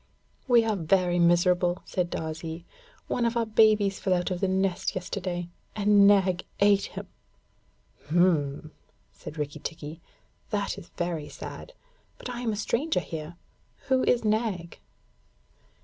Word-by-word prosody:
'We 240 -2 +6
are 220 -1 +1
very 175 0 +2
miserable,' 175 +1 +3
said 180 -2 -1
Darzee. 160 +1 -5 0.4
'One 245 - -1
of 235 0 +1
our 230 - +1
babies 215 -3 +3
fell 185 -2 +1
out 180 +1 -1
of 180 - -2
the 195 - +1
nest 190 -1 0
yesterday, 180 -2 -3 0.3
and 205 -1 +5
Nag 190 -3 +4 0.2
ate 200 0 +4
him.' - - -4 1.0
'H'm!' 155 -3 +1 0.4
said 155 - -10
Rikki 145 -1 -4
tikki, 160 0 -7 0.5
'that 205 -3 -2
is 170 - -14
very 170 -4 -2
sad - - -9 0.4
but 250 - -7
I 240 0 -5
am 235 -2 0
a - - -2
stranger 255 +9 0
here. 160 +1 -7 0.5
Who 260 -1 +3
is 240 -2 +2
Nag?' 210 -6 -1
185 Hz, 140 wpm, -27 LUFS, 170-210 Hz, 1.0 s, We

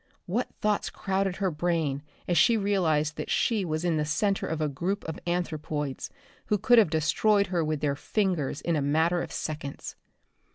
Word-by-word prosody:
What 225 +8 -1
thoughts 210 -1 +1
crowded 195 -1 -1
her 190 -2 0
brain 155 -3 0 0.3
as 175 - +1
she 230 +6 +5
realized 165 -7 +1
that - - -4
she 220 -4 +1
was 155 -1 -2
in 165 -3 +2
the 150 - +1
center 195 +7 0
of 160 - -2
a 155 - +1
group 175 +8 -2
of 160 - -5
anthropoids 155 -5 -2 0.4
who 210 - +2
could 235 +4 +5
have 205 -7 +4
destroyed 185 +7 +2
her 170 -2 +2
with 155 -1 -2
their 145 -2 +1
fingers 170 -5 -1
in 170 +2 0
a 150 - +1
matter 160 +5 +2
of - - -6
seconds! 150 -3 -5
170 Hz, 180 wpm, -28 LUFS, 150-195 Hz, 0.4 s, she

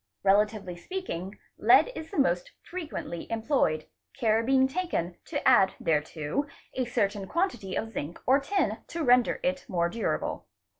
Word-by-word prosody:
Relatively 200 -1 +2
speaking 195 - -5 0.2
lead - - +6
is 320 -8 -7
the - - -7
most 180 -11 +1
frequently 315 - -6
employed, 225 - +1 0.3
care 225 -3 +3
being 265 +2 +4
taken 265 - -2
to 290 -3 -2
add 195 -7 +5
thereto 155 - -1 0.3
a 255 - -1
certain 205 -5 -1
quantity 335 - -1
of 225 - -2
zinc 170 -5 -5
or 265 +2 +5
tin 380 +8 0
to 335 -1 -3
render 250 -2 +4
it 275 0 0
more 170 -5 +1
durable. 230 +4 -2
225 Hz, 145 wpm, -28 LUFS, 185-275 Hz, 0.3 s, lead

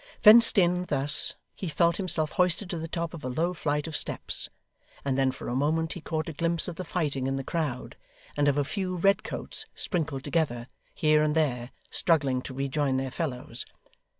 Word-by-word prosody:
Fenced 230 +1 +8
in, 180 -1 +3
thus, 140 -2 +1 0.2
he 190 - -5
felt 170 +2 +2
himself 170 -5 0
hoisted 180 +2 +1
to 170 - -3
the 165 - -4
top 170 0 -3
of 165 - -8
a 130 - -2
low 165 +8 0
flight 150 -3 -1
of 160 -2 -5
steps, - - -2 0.6
and 135 -2 +1
then 135 0 +3
for - - -8
a 120 - -2
moment 160 +4 +1
he 175 - -8
caught 160 0 -3
a 165 - -4
glimpse 165 +2 0
of 175 - -5
the 185 - -5
fighting 145 -7 -1
in 135 - -1
the 135 - -3
crowd, 145 -5 -3 0.4
and 145 0 +2
of 145 0 +3
a 145 - +3
few 185 +4 -3
red 195 +3 +3
coats - - -5
sprinkled 160 -7 -1
together, 120 -8 -1 0.3
here 155 -1 +4
and 150 0 +1
there, 125 -6 0 0.2
struggling 140 -7 +2
to 130 - -8
rejoin 135 +1 0
their 130 0 -2
fellows. 135 -7 -3
155 Hz, 200 wpm, -28 LUFS, 135-170 Hz, 0.6 s, Fenced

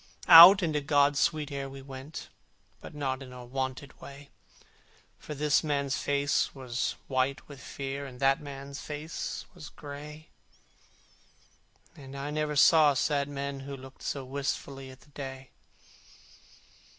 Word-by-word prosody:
Out 180 +3 +11
into 155 -3 0
God's 145 0 +3
sweet 150 -2 0
air 140 -1 -4
we 135 0 -10
went, 135 +3 -9 0.5
But - - -11
not 135 -2 -3
in 125 -2 -11
wonted 135 +1 -5
way, 140 0 -12 0.9
For 150 - -8
this 150 0 +2
man's 140 -2 -1
face 145 0 0
was 130 -2 -3
white 130 +1 -1
with 140 -2 -12
fear, 140 0 -6
And 125 -2 -12
that 135 +1 +3
man's 140 -1 -8
face 150 +2 -6
was 160 -5 -10
gray, 150 +1 -10 1.7
And 135 -1 -10
I 140 +2 -4
never 150 0 -2
saw 150 0 +6
sad 140 +1 0
men 140 -1 -4
who 135 +1 -7
looked 130 0 -13
So 140 -2 -4
wistfully 135 0 -4
at 130 0 -14
the 145 - -22
day. 135 -2 -8
140 Hz, 140 wpm, -29 LUFS, 135-145 Hz, 1.7 s, Out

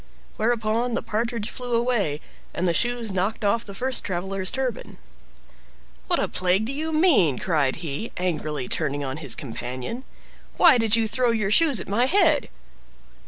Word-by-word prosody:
Whereupon 230 +1 0
the - - -2
Partridge 230 0 -2
flew 245 -1 -3
away, 230 -11 0 0.3
and 180 - 0
the 170 - +2
shoes 240 +2 0
knocked 195 +4 -1
off 230 +3 +2
the 200 - -10
first 260 +4 0
traveler's 190 +1 -2
turban. 260 -2 -3 1.1
"What 350 - +2
a - - 0
plague 185 +3 +1
do 255 - -1
you 315 +3 -2
mean?" 305 - +4
cried 150 -7 +1
he, 155 +10 -4
angrily 155 -7 -2
turning 145 -2 -2
on 135 +1 -4
his 145 -5 -1
companion. 130 - -5 0.5
"Why 325 -8 +6
did 225 -1 +3
you 225 -1 +1
throw 245 +2 +1
your 215 -4 0
shoes 290 0 +3
at - - -6
my 225 +5 +2
head?" 320 -1 +3
220 Hz, 165 wpm, -24 LUFS, 175-245 Hz, 1.1 s, Why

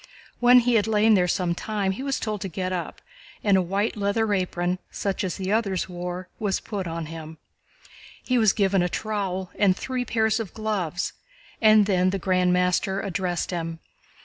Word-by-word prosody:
When 245 +1 +7
he 245 +1 +1
had 220 -2 +3
lain 220 0 +4
there 180 -3 +3
some 175 0 0
time, 200 +1 -2
he 190 - -5
was 275 -1 -1
told 215 -3 -3
to 195 - -3
get 185 +1 -3
up, 180 - -5 0.4
and 205 -2 +4
a 190 - +4
white 195 +4 -1
leather 210 +1 0
apron, 180 -1 -1
such 200 -1 -2
as 185 - -3
the 190 0 -3
others 205 -4 0
wore, 180 0 -5
was 205 -3 0
put 200 -5 -5
on 165 0 -4
him: 160 0 -8 0.9
he 255 -1 +1
was 220 -3 +5
given 195 -2 +2
a 180 - +1
trowel 190 -3 -3
and 195 -2 +4
three 255 -1 -2
pairs 220 -2 +1
of 220 -5 -6
gloves, 195 -6 -2 0.5
and 215 -2 +6
then 185 -2 +2
the 195 - -1
Grand 185 -1 +2
Master 180 +2 +1
addressed 185 -3 -2
him. 165 -2 -3
195 Hz, 185 wpm, -25 LUFS, 180-215 Hz, 0.9 s, When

